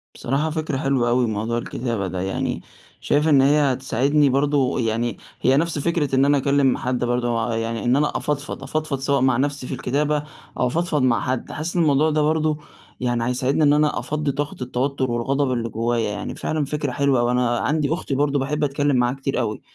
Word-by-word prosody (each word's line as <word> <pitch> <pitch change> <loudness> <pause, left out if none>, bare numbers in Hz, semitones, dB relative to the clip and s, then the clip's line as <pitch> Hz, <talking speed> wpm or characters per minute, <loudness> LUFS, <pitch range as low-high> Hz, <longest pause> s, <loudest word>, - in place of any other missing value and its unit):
بصراحة 140 +5 -1
فكرة 155 -3 -2
حلوة 135 -4 +1
أوي 120 0 +2
موضوع 110 +2 -2
الكتابة 115 -3 -3
ده، 90 0 -4
يعني 95 +1 -2 0.4
شايف 150 +2 +1
إن 145 -4 +5
هي 145 +3 +4
هتساعدني 135 +3 +2
برضه، 140 0 +1
يعني 115 -1 -1 0.2
هي 130 +1 +4
نَفْس 165 0 0
فكرة 150 -3 0
إن 135 +1 +4
أنا 145 0 +4
أكلّم 140 -1 +2
حد 125 0 -2
برضه 120 -1 0
آآ، - - -1
يعني 115 0 -2
إن 120 +1 +3
أنا 150 +1 +1
أفضفض، 150 0 -3
أفضفض 155 -3 -2
سواء 140 0 +1
مع 130 -2 +3
نَفْسي 140 -1 -2
في - - -4
الكتابة 145 +3 0 0.4
أو 125 - +3
أفضفض 155 +2 0
مع 125 -2 +2
حد. 130 -1 -3
حاسس 160 +3 -4
إن 175 - +3
الموضوع 150 0 +3
ده 155 0 +1
برضه 155 0 +1 0.4
يعني 120 -2 0
هيساعدني 130 +4 +1
إن 145 -1 +5
أنا 150 0 +2
أفضّي 150 -1 -2
طاقة 145 +1 -3
التوتُّر 130 +1 -1
والغضب 135 +3 0
اللي 115 -2 -2
جوّايا، 115 0 -1
يعني 105 0 -5
فعلًا 155 -2 -2
فكرة 145 -1 -3
حلوة 140 0 +2
أوي. 120 0 +2
أنا 125 -1 +1
عندي 150 -1 0
أختي 155 -5 -3
برضه 145 +1 +1
باحب 150 +3 -1
أتكلّم 145 0 +1
معاها 125 0 +2
كتير 135 0 -2
أوي، 110 -3 -2
135 Hz, 200 wpm, -22 LUFS, 120-145 Hz, 0.4 s, إن